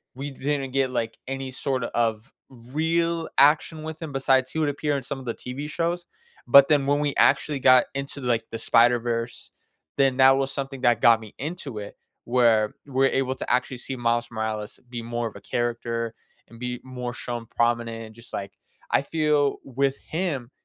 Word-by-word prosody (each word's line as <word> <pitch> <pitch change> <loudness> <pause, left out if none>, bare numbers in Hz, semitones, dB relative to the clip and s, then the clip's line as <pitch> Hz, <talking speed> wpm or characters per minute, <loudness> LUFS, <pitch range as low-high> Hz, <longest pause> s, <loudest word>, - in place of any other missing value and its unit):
we 140 +2 -5
didn't 135 -1 -2
get, 135 -1 +1
like, 115 -2 -2
any 135 0 -4
sort 130 -1 -2
of 115 0 -1 0.2
real 160 +7 -1
action 155 +2 +4
with 160 +1 -7
him 160 -3 -5
besides 135 -1 +2
he 160 - -3
would 155 - +2
appear 145 0 -1
in 135 - -5
some 135 +2 -5
of 130 - -10
the 115 - -2
TV 140 +4 -6
shows, 175 +2 -2 0.4
but 140 0 +8
then 145 -3 +4
when 145 +1 +2
we 145 -1 0
actually 145 -3 +3
got 130 -1 +6
into, 140 +1 -5
like, 115 -3 0
the 115 - -3
Spider-Verse, 115 0 +2 0.5
then 135 -2 +3
that 135 0 +7
was 135 0 -1
something 135 -1 -5
that 120 -2 +3
got 115 -1 +6
me 110 -2 -12
into 145 -5 -5
it 105 -1 -7 0.3
where 115 -3 +3
we're 135 0 +2
able 130 0 0
to - - -6
actually 125 +1 +1
see 130 +2 -6
Miles 120 -1 0
Morales 110 -1 -4
be 120 -1 -5
more 120 0 -2
of 110 - -10
a 100 - -10
character 115 0 -2 0.3
and 115 0 -15
be 125 0 -4
more 125 -2 -5
shown 120 -1 -5
prominent, 115 0 0
and 110 0 -14
just, 115 +1 -15
like 100 -1 -5 0.4
I - - +4
feel 150 -3 +1
with 135 +1 0
him, 155 -8 -3
130 Hz, 190 wpm, -25 LUFS, 120-140 Hz, 0.5 s, but